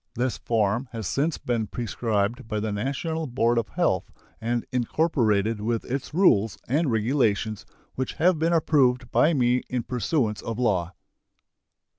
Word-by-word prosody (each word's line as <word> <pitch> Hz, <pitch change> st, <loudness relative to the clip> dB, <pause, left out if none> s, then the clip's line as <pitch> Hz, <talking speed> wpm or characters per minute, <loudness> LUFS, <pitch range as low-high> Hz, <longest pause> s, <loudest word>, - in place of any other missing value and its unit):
This 125 Hz, +1 st, 0 dB
form 115 Hz, +2 st, 0 dB
has 110 Hz, -2 st, -5 dB
since 145 Hz, -, 0 dB
been 115 Hz, -3 st, -2 dB
prescribed 115 Hz, +1 st, -2 dB
by 105 Hz, -1 st, -2 dB
the 110 Hz, 0 st, -2 dB
National 140 Hz, +9 st, -2 dB
Board 120 Hz, -1 st, +2 dB
of 115 Hz, -, -4 dB
Health -, -, 0 dB, 0.3 s
and 120 Hz, +1 st, -1 dB
incorporated 115 Hz, -, +1 dB
with 115 Hz, +1 st, -1 dB
its 130 Hz, +2 st, -4 dB
rules 115 Hz, -, +3 dB
and 145 Hz, +4 st, +1 dB
regulations, 110 Hz, -3 st, 0 dB, 0.3 s
which 130 Hz, 0 st, -3 dB
have 170 Hz, 0 st, +2 dB
been 165 Hz, +2 st, +2 dB
approved 130 Hz, -7 st, +2 dB
by 160 Hz, +1 st, +4 dB
me 125 Hz, -1 st, +2 dB
in 125 Hz, -2 st, -1 dB
pursuance 120 Hz, -4 st, -1 dB
of 115 Hz, -1 st, -4 dB
law. 95 Hz, -8 st, 0 dB
120 Hz, 145 wpm, -25 LUFS, 110-135 Hz, 0.3 s, by